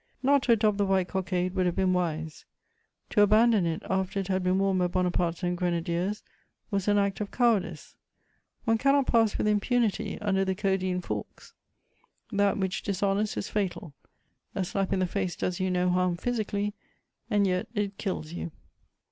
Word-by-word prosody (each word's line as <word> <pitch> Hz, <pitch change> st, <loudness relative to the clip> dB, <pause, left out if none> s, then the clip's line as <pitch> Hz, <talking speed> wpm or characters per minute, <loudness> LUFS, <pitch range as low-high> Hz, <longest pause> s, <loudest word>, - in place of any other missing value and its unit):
Not 280 Hz, +1 st, +4 dB
to 245 Hz, -, +4 dB
adopt 210 Hz, -2 st, +2 dB
the 200 Hz, -, +3 dB
white 190 Hz, -2 st, +2 dB
cockade 185 Hz, -1 st, -1 dB
would 185 Hz, -2 st, +1 dB
have 175 Hz, -, -1 dB
been 185 Hz, -1 st, +2 dB
wise; 160 Hz, -3 st, -2 dB, 0.7 s
to 205 Hz, -, +4 dB
abandon 215 Hz, -2 st, +5 dB
it 165 Hz, 0 st, -3 dB
after 190 Hz, +1 st, -1 dB
it 195 Hz, -1 st, -4 dB
had 190 Hz, 0 st, +1 dB
been 185 Hz, +1 st, +2 dB
worn 195 Hz, -1 st, +2 dB
by 180 Hz, -, +2 dB
Bonaparte's 175 Hz, -1 st, 0 dB
own 175 Hz, 0 st, +1 dB
Grenadiers 175 Hz, +3 st, -1 dB, 0.5 s
was 195 Hz, -1 st, -1 dB
an 205 Hz, 0 st, +4 dB
act 200 Hz, 0 st, 0 dB
of 205 Hz, -, -3 dB
cowardice: 235 Hz, -5 st, 0 dB, 0.7 s
one 225 Hz, -1 st, +2 dB
cannot 275 Hz, +1 st, +3 dB
pass 225 Hz, -4 st, +3 dB
with -, -, 0 dB
impunity 210 Hz, +1 st, +1 dB
under 195 Hz, -2 st, +1 dB
the 190 Hz, 0 st, -1 dB
Caudine 185 Hz, -2 st, 0 dB
Forks; -, -, -6 dB, 0.8 s
that 205 Hz, -1 st, +2 dB
which 190 Hz, -1 st, -1 dB
dishonours 200 Hz, +1 st, 0 dB
is -, -, -3 dB
fatal: 185 Hz, -6 st, -3 dB, 0.6 s
a 195 Hz, -, 0 dB
slap 195 Hz, +1 st, -2 dB
in 195 Hz, -, +2 dB
the 185 Hz, -, +2 dB
face 185 Hz, -1 st, -2 dB
does 180 Hz, -1 st, -2 dB
you 185 Hz, 0 st, 0 dB
no 180 Hz, 0 st, +1 dB
harm 180 Hz, -1 st, +1 dB
physically, 210 Hz, -2 st, -2 dB, 0.6 s
and 205 Hz, -3 st, +3 dB
yet 180 Hz, -1 st, 0 dB
it 205 Hz, -1 st, -2 dB
kills 180 Hz, -6 st, -3 dB
you. 175 Hz, -, -4 dB
195 Hz, 175 wpm, -28 LUFS, 180-205 Hz, 0.8 s, abandon